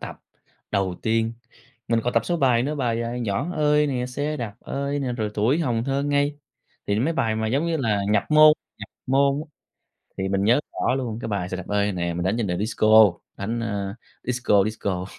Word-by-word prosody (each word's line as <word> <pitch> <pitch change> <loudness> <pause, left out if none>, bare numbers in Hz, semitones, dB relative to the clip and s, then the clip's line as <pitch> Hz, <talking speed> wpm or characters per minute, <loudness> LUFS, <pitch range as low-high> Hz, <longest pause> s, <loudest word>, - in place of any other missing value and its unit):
tập - - -7 0.5
đầu 95 -3 0
tiên, 115 0 +1 0.6
mình 115 -1 +2
còn 125 - 0
tập 115 - +2
số 175 - 0
bài 125 -6 +3
nữa 150 +3 -2
bài, 120 -5 -1
à, 120 +1 -4
"Nhỏ 110 - -2
ơi" 150 -1 +3
nè, 125 -3 -2
"Xe 145 +4 -3
đạp 115 -7 -5
ơi" 140 +1 -3
nè, 130 -3 -2
rồi 110 -3 -2
"Tuổi 115 +9 +2
hồng 120 -6 0
thơ 135 +1 0
ngây". 145 0 0 0.5
Thì 100 - +1
nó 110 +4 +1
mấy 165 - +1
bài 110 -8 0
mà 110 0 -1
giống 135 +9 0
như 165 -1 0
là 110 -8 0
nhập 105 -1 +3
môn 155 0 +8 0.3
nhập - - -8 0.2
môn 140 +2 +2
á, 155 0 -10 0.7
thì 95 0 -1
mình 100 0 0
nhớ 120 +6 +4
rõ - - 0
luôn 120 -5 -3
cái 115 - -4
bài 100 -4 -2
"Xe 95 - -4
đạp 90 - -8
ơi" 105 0 +1
nè, 85 -2 -2
mình 85 0 -2
đánh 95 +4 +1
trên 115 - 0
điệu 90 -2 -2
disco 110 -1 +5 0.2
đánh, 115 +4 -3
a, 100 -3 -3 0.3
disco 120 -5 +2
disco. 100 -4 -3
115 Hz, 220 wpm, -24 LUFS, 105-140 Hz, 0.7 s, môn